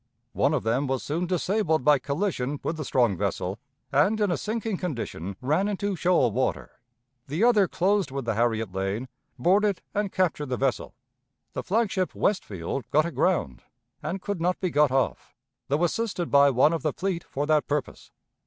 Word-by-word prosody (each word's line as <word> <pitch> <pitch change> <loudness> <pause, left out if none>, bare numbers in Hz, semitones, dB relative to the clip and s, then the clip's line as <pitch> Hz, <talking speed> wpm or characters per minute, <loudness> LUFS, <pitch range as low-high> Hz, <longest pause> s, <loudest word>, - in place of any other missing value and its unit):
One - - +2
of - - -1
them 125 +6 +1
was 130 0 -1
soon 170 +5 -2
disabled 180 -3 +1
by 150 -2 +6
collision 145 -3 -2
with 160 - -2
the 155 - -3
strong 120 -7 +2
vessel, 90 +4 -2 0.3
and 155 +11 +3
in 205 -3 +2
a - - +2
sinking 220 -2 -3
condition 115 - -4
ran 155 +10 +1
into 205 -1 -1
shoal 170 -9 +3
water. 130 +5 -1 0.6
The 155 +9 -1
other 220 -5 +5
closed 195 -2 +1
with 135 -1 -4
the 115 - 0
Harriet 110 -3 0
Lane, 95 +6 -2 0.3
boarded 195 +8 +2
and 205 -1 -1
captured 165 -5 0
the 125 -1 -2
vessel. 135 -2 -1 0.6
The - - -3
flag 215 +2 0
ship 185 -2 -1
Westfield 110 - -2
got 155 +2 +3
aground 150 - 0 0.4
and 190 +1 -4
could 200 -5 -3
not 180 +2 +1
be 185 -3 -1
got 150 -1 +4
off, 130 -2 -1 0.3
though 145 +4 +1
assisted 185 -1 -1
by 140 0 +6
one 135 +5 +4
of 165 - -1
the 150 -1 -1
fleet 185 -3 -2
for 145 +2 -3
that 155 -1 +2
purpose. 145 -3 -3
155 Hz, 180 wpm, -26 LUFS, 130-190 Hz, 0.6 s, by